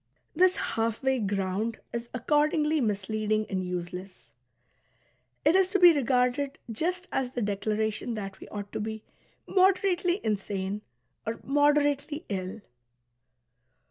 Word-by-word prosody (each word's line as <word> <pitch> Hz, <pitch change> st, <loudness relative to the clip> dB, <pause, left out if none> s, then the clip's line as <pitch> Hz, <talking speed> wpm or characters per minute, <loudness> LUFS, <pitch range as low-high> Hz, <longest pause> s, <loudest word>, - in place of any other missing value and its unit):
This 370 Hz, +2 st, +5 dB
half 225 Hz, +2 st, -1 dB
way 265 Hz, -1 st, +2 dB
ground 200 Hz, +2 st, -1 dB, 0.2 s
is 235 Hz, 0 st, -4 dB
accordingly 300 Hz, +4 st, +2 dB
misleading 215 Hz, 0 st, 0 dB
and 185 Hz, -1 st, -1 dB
useless; 180 Hz, -5 st, -6 dB, 1.1 s
it 310 Hz, -, +6 dB
is 380 Hz, -1 st, +5 dB
to 390 Hz, +1 st, +1 dB
be 350 Hz, -2 st, +9 dB
regarded 270 Hz, +1 st, +1 dB
just 360 Hz, -, -2 dB
as 260 Hz, -2 st, 0 dB
the 245 Hz, -1 st, -4 dB
declaration 215 Hz, +3 st, -1 dB
that 195 Hz, -2 st, -6 dB
we -, -, -10 dB
ought 205 Hz, -1 st, -7 dB
to -, -, -3 dB
be 220 Hz, 0 st, -4 dB, 0.4 s
"moderately" 370 Hz, -1 st, +3 dB
insane, 200 Hz, -1 st, -2 dB, 0.4 s
or 225 Hz, +1 st, -4 dB
"moderately" 290 Hz, +2 st, +2 dB
ill. 195 Hz, +2 st, -4 dB
230 Hz, 120 wpm, -28 LUFS, 205-295 Hz, 1.1 s, be